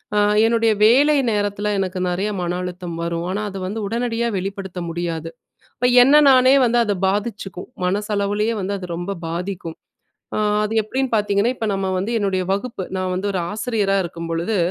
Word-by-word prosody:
அ - - +4 0.3
என்னுடைய 230 -1 +3
வேலை 285 +6 +5
நேரத்துல 205 0 -1
எனக்கு 185 -1 -2
நெறைய 190 +4 -1
மன 175 -1 -1
அழுத்தம் 180 -2 -6
வரும். 170 0 -2
ஆனா 205 +3 -2
அத 195 - -7
வந்து 220 +3 -4
உடனடியா 235 +1 -1
வெளிப்படுத்த 190 -1 -5
முடியாது. 165 -1 -4 0.5
அப்ப 245 - +2 0.2
என்ன 275 +3 +4 0.2
நானே 255 +1 +6
வந்து 240 +1 +2
அது 205 -2 0
பாதிச்சுக்கும். 200 -3 -4 0.2
மனசளவுலயே 205 +2 0
வந்து 195 +2 -2
அது 180 - -7
ரொம்ப 185 +3 -4
பாதிக்கும். 170 -1 -5 0.6
அ - - 0 0.3
அது 215 +1 -2
எப்டின்னு 260 +5 -2
பாத்தீங்கன்னா, 205 +1 +2
இப்ப 225 - -3
நம்ம 195 -1 -1
வந்து 195 +5 -2
என்னுடைய 195 -3 0
வகுப்பு, 200 +1 -2
நான் 185 0 -2
வந்து 185 +2 -2
ஒரு 195 - -1
ஆசிரியரா 210 -2 0
இருக்கும் 170 -1 -6
பொழுது, 170 +6 -1
200 Hz, 165 wpm, -21 LUFS, 185-225 Hz, 0.6 s, நானே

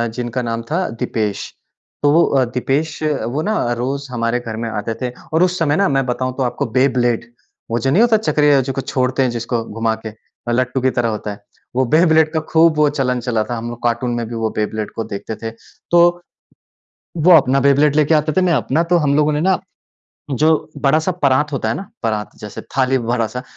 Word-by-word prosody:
जिनका 125 0 -3
नाम 115 -1 -3
था 180 +3 0
दीपेश। 105 -3 -2 0.5
तो 145 - +5
वो 165 +3 +5
अ, 135 -2 +2
दीपेश 135 +6 -2
वो 145 -2 -1
ना 215 +5 -1 0.2
अ, - - +2
रोज़ 135 +3 -4
हमारे 115 0 0
घर 115 -2 -6
में - - -3
आते 110 +1 -3
थे 125 -1 -2 0.2
और 165 +3 +4
उस 180 0 +1
समय 150 -3 +2
ना 200 - +3
मैं 135 -2 +1
बताऊँ 130 +1 -2
तो 135 - 0
आपको 120 -1 -1
बेब्लेड 120 -3 +2 0.5
वो 120 - +1
जो 135 - 0
नहीं 190 - +4
होता 230 -2 +5
चक्रीय 150 -6 +3
जो 135 +1 -3
को 135 - -2
छोड़ते 130 +1 0
हैं 125 - +1
जिसको 120 0 -2
घुमा 115 0 -1
के, - - -3
अ, 110 +2 -10
लट्टू 125 +2 0
की 130 - +3
तरह 120 -1 +2
होता 105 -1 -4
है। 100 0 -11 0.3
वो 130 - +3
बेब्लेड 160 -2 +4
का 160 - +1
खूब 165 0 +5
वो 150 -1 +4
चलन 130 -4 -1
चला 115 -3 -1
था। 120 - -4
हम 115 +1 -5
लोग 120 0 -8
कार्टून 120 +1 0
में 120 -1 -2
भी 115 - -6
वो 110 -1 -1
बेब्लेड 110 0 -2
को 115 - -2
देखते 105 0 -6
थे। 115 +1 -6 0.4
तो, 175 0 +4 1.0
वो 165 +3 +3
अपना 135 -1 +3
बेब्लेड 140 +2 +3
लेके 155 +1 +3
आते 155 0 +1
थे, 185 - +2
मैं 180 -2 +2
अपना 135 +4 +1
तो 175 - +5
हम 145 -3 +1
लोगों 150 0 +3
ने 150 - 0
ना 190 +3 +2 0.7
जो 155 +5 +2 0.3
बड़ा-सा 155 +5 +2
परात 145 -3 +1
होता 125 -6 -2
है 115 - -1
ना? - - -5 0.2
परात 110 -2 -2
जैसे 105 -1 -8 0.2
थाली 130 0 +3
बड़ा-सा, 125 +1 -2
130 Hz, 220 wpm, -18 LUFS, 115-150 Hz, 1.0 s, तो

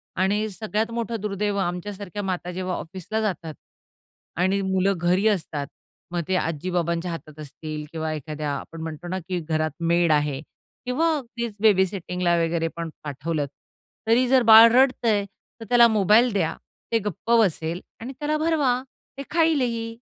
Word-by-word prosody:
आणि 205 +3 +1
सगळ्यात 215 +2 -2
मोठं 230 -1 -3
दुर्दैव 205 0 -1
आमच्यासारख्या 195 +2 -4
माता 180 -2 -3
जेव्हा 185 0 -3
ऑफिसला 190 +5 -4
जातात 170 -7 -3 0.9
आणि 190 +2 +2
मुलं 190 0 +1
घरी 180 +5 +2
असतात, 155 -8 -1 0.4
मग 175 -1 -1
ते 190 - +1
आजी-बाबांच्या 170 +1 -1
हातात 155 -2 -9
असतील 155 +1 -7
किंवा 160 -1 -3
एखाद्या 150 0 -4
आपण 165 +3 -9
म्हणतो 160 +1 -6
ना 185 +2 -2
की 180 -2 -1
घरात 155 -1 -1 0.2
मेड 170 -1 +3
आहे 145 -2 +1 0.4
किंवा 295 +7 +1
अगदीच 235 -4 -5
बेबीसिटिंगला 185 -4 +2
वगैरे 165 0 0
पण 170 -1 -4
पाठवलंत, 150 +1 -3 0.6
तरी 240 +3 +4
जर 260 +1 +5
बाळ 225 +1 +11
रडतय, 240 -5 +3 0.3
तर 225 - -8
त्याला 240 -1 +7
मोबाईल 220 +3 +4
द्या 175 -5 0 0.4
ते 230 - +3
गप्प 210 +4 -3
बसेल 170 -4 0 0.2
आणि 245 +4 -7
त्याला 300 +1 0
भरवा. 295 -6 +1 0.4
ते 275 - -5
खाईलही. 250 -9 +1
190 Hz, 145 wpm, -24 LUFS, 165-225 Hz, 0.9 s, बाळ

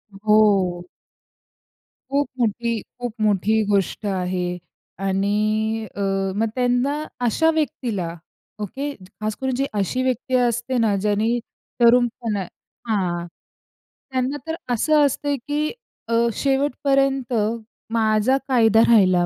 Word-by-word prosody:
हो. 200 -4 +3 1.2
खूप 285 +1 +1
मोठी, 230 0 0 0.2
खूप 245 -3 -4
मोठी 215 +1 +2
गोष्ट 200 +1 0
आहे. 180 -2 -1 0.4
आणि 215 +3 0
अ, 200 - -4 0.3
मग 225 +2 +1
त्यांना 250 +2 +1 0.3
अशा 320 +8 +3
व्यक्तीला 230 - -2 0.5
ओके, 275 +8 -3 0.3
खास 215 0 -2
करून 265 -1 0
जी 275 +2 0
अशी 255 +7 0
व्यक्ती 255 0 -1
असते 245 +1 +1
ना 220 -3 +2
ज्याने 210 +2 +1 0.5
तरुणपणे 235 -4 +3 0.4
हां, 180 -5 -1 0.9
त्यांना 260 +2 -1
तर 320 - -2 0.2
असं 300 +5 +4
असतं 285 +1 0
की 300 +1 0 0.4
अ, 230 - -2 0.2
शेवटपर्यंत 275 -1 +1 0.6
माझा 220 +3 +3
कायदा 225 -4 +4
राहिला 185 -6 +5
225 Hz, 105 wpm, -22 LUFS, 205-260 Hz, 1.2 s, राहिला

